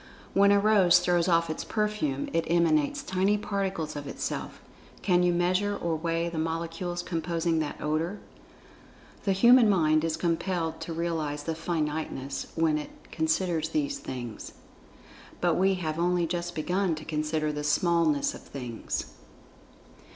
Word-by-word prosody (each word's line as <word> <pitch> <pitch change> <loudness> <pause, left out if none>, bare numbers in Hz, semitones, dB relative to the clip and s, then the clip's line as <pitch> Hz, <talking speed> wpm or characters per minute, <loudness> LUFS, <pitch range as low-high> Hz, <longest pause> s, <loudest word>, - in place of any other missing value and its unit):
When 200 +1 +5
a 200 - +5
rose 200 -4 +5
throws 175 -1 +2
off 170 -1 +3
its 155 - -4
perfume, 210 -11 -1
it 165 -1 0
emanates 165 -3 +2
tiny 190 +3 +1
particles 195 -7 -3
of 145 -1 -6
itself—can 180 -2 -3
you 180 0 +3
measure 185 +4 +1
or 170 -1 -1
weigh 165 +1 -1
the 170 -2 -4
molecules 165 +2 -3
composing 165 -1 -1
that 155 -2 -3
odor? 160 +6 -1 1.1
The 195 - +2
human 235 +4 +6
mind 155 -5 +3
is 165 -1 -1
compelled 170 -1 -1
to - - -5
realize 160 -3 -2
its 160 0 -2
finiteness 150 -4 -3
when 160 -2 +2
it 150 - -11
considers 160 +1 0
these 285 -2 -1
things—but 130 - -6
we 190 +3 +3
have 160 -3 -3
only 175 0 +2
just 175 +1 -3
begun 180 +2 0
to 155 0 -9
consider 155 0 -1
the 150 0 -4
smallness 160 -1 +2
of - - -10
Things. 125 -4 -5
170 Hz, 140 wpm, -28 LUFS, 155-180 Hz, 1.1 s, human